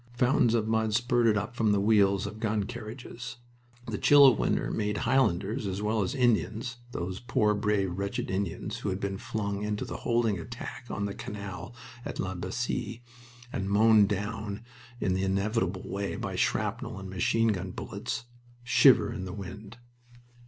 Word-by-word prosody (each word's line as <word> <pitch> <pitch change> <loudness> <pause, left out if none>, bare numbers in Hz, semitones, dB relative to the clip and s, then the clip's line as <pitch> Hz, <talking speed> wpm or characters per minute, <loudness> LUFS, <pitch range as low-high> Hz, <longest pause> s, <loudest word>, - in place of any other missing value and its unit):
Fountains 125 -1 +3
of 110 -2 +1
mud 110 -1 +1
spurted 120 -2 +3
up 110 +4 -3
from 110 -3 +2
the 100 - +3
wheels 100 -2 +3
of 105 +2 -6
gun 110 -2 0
carriages. 120 +2 -7 0.5
The 110 -3 -4
chill 145 -1 +8
of 130 -5 +6
winter - - 0
made 105 -1 -1
Highlanders 110 -3 +1
as 95 0 -3
well 110 +1 +1
as 100 +8 -1
Indians 120 -1 +1
those 90 -2 -4
poor, 110 -4 +2
brave, 100 -3 0
wretched 100 -1 -2
Indians 95 -2 -2
who - - -3
had 95 0 -2
been 100 -1 -3
flung 100 -2 -3
into 105 0 -2
the - - -5
holding 115 -5 +1
attack 120 +5 -8
on 100 - -2
the 100 - -3
canal 100 +3 -7 0.3
at - - -5
La 95 0 -2
Bassee, 115 +5 -3 0.5
and 95 0 -2
mown 105 0 +6
down 105 +1 -3 0.4
in 95 - +1
the 95 - 0
inevitable 95 0 0
way 100 0 -3
by - - -4
shrapnel - - -1
and 95 0 -7
machine 110 +5 +1
gun 95 -3 -1
bullets 95 - -5 0.4
shiver 125 -1 +5
in 95 -4 -5
the 90 - -6
wind. 100 +3 -8
105 Hz, 165 wpm, -29 LUFS, 100-115 Hz, 0.5 s, chill